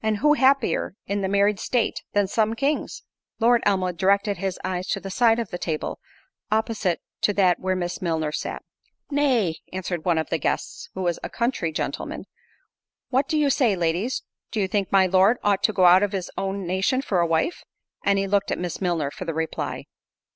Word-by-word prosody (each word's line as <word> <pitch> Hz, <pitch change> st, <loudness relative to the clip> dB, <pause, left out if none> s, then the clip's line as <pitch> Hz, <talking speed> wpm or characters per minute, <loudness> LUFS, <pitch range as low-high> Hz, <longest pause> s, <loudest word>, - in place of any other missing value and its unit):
and 220 Hz, -1 st, +1 dB
who 295 Hz, +8 st, +4 dB
happier 275 Hz, -8 st, +2 dB
in 200 Hz, +1 st, -2 dB
the 190 Hz, -, 0 dB
married 200 Hz, 0 st, +2 dB
state 245 Hz, -3 st, 0 dB
than 205 Hz, -1 st, +3 dB
some 220 Hz, +3 st, 0 dB
kings?" 280 Hz, +5 st, -1 dB, 0.4 s
Lord 235 Hz, +1 st, +4 dB
Elmwood 185 Hz, -3 st, +1 dB
directed 200 Hz, +1 st, +2 dB
his 190 Hz, 0 st, -3 dB
eyes 185 Hz, 0 st, -3 dB
to -, -, -1 dB
the 195 Hz, 0 st, -7 dB
side 230 Hz, +2 st, +4 dB
of 230 Hz, -5 st, -3 dB
the 175 Hz, -, -4 dB
table, 155 Hz, -3 st, -3 dB, 0.5 s
opposite 215 Hz, -5 st, 0 dB, 0.2 s
to 205 Hz, -, +2 dB
that 185 Hz, -3 st, +3 dB
where 185 Hz, 0 st, 0 dB
Miss 175 Hz, -1 st, -3 dB
Milner 160 Hz, -4 st, -1 dB
sat. -, -, -4 dB, 0.5 s
"Nay," 250 Hz, -, +2 dB
(answered 180 Hz, -3 st, -4 dB
one 175 Hz, -3 st, +2 dB
of 160 Hz, -, -2 dB
the 165 Hz, -, +1 dB
guests, -, -, -3 dB
who 190 Hz, -, -3 dB
was 175 Hz, -2 st, 0 dB
a -, -, -5 dB
country 235 Hz, -9 st, -1 dB
gentleman) 155 Hz, -, -4 dB, 0.9 s
"what 265 Hz, +2 st, +2 dB
do 315 Hz, -, 0 dB
you 290 Hz, -2 st, +3 dB
say, 240 Hz, -7 st, +3 dB
ladies—do 180 Hz, +6 st, -3 dB
you 195 Hz, -, +1 dB
think 200 Hz, -1 st, -1 dB
my 195 Hz, -1 st, +5 dB
Lord 190 Hz, +5 st, +4 dB
ought 200 Hz, -2 st, +2 dB
to -, -, +3 dB
go 185 Hz, -2 st, +3 dB
out 180 Hz, +2 st, +7 dB
of 205 Hz, 0 st, 0 dB
his 185 Hz, -2 st, -3 dB
own 195 Hz, 0 st, -3 dB
nation 195 Hz, +9 st, 0 dB
for 195 Hz, -10 st, 0 dB
a 170 Hz, -, +2 dB
wife?" 165 Hz, -, 0 dB, 0.4 s
and 200 Hz, 0 st, +3 dB
he 195 Hz, -, +1 dB
looked 200 Hz, 0 st, +1 dB
at -, -, -1 dB
Miss 175 Hz, +1 st, -4 dB
Milner 165 Hz, -6 st, 0 dB
for 185 Hz, -, -7 dB
the 165 Hz, -2 st, -3 dB
reply. 160 Hz, 0 st, -3 dB
195 Hz, 200 wpm, -24 LUFS, 180-220 Hz, 0.9 s, out